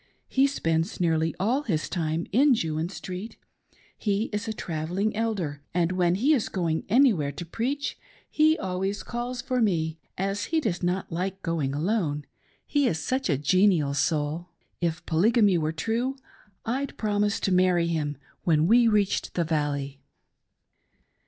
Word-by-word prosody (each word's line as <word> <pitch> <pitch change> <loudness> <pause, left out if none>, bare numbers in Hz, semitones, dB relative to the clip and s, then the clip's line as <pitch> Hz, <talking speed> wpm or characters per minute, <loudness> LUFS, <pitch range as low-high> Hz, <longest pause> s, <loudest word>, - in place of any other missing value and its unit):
He 270 +1 +3
spends 165 - -1
nearly 165 -2 +1
all 235 +9 +1
his 170 - -1
time 165 -2 -1
in 265 +5 +5
Jewin 160 -4 -2
Street; 190 +3 -7 0.6
he 210 +1 -1
is 210 +2 -2
a - - -1
travelling 180 +3 -2
Elder, 195 -11 -2
and 175 -1 +2
when 180 -1 +2
he 265 +11 +3
is 250 -8 0
going 165 -4 -1
anywhere 210 - +4
to 155 +5 -6
preach 260 - -3 0.3
he 310 +1 +3
always 190 - -2
calls 245 +1 -4
for 255 -2 0
me, 160 -6 0 0.2
as 195 +2 -1
he 325 +5 +1
does 205 - -2
not 180 +1 -1
like 190 +3 -3
going 155 -6 -1
alone, 155 -3 -1 0.4
he 290 -2 +2
is 165 - 0
such 260 +7 -1
a 140 - +2
genial 165 -1 +3
soul. 155 +3 0 0.3
If 170 -2 -2
Polygamy 200 +2 +3
were 155 0 0
true 230 +11 -1 0.5
I'd 260 +4 -2
promise 205 -1 0
to 195 - 0
marry 180 -2 +3
him 155 -3 -1 0.3
when 155 -2 +3
we 235 +5 +5
reached 210 -3 +1
the 175 - +2
valley." 145 -3 -2
185 Hz, 150 wpm, -26 LUFS, 160-225 Hz, 0.6 s, in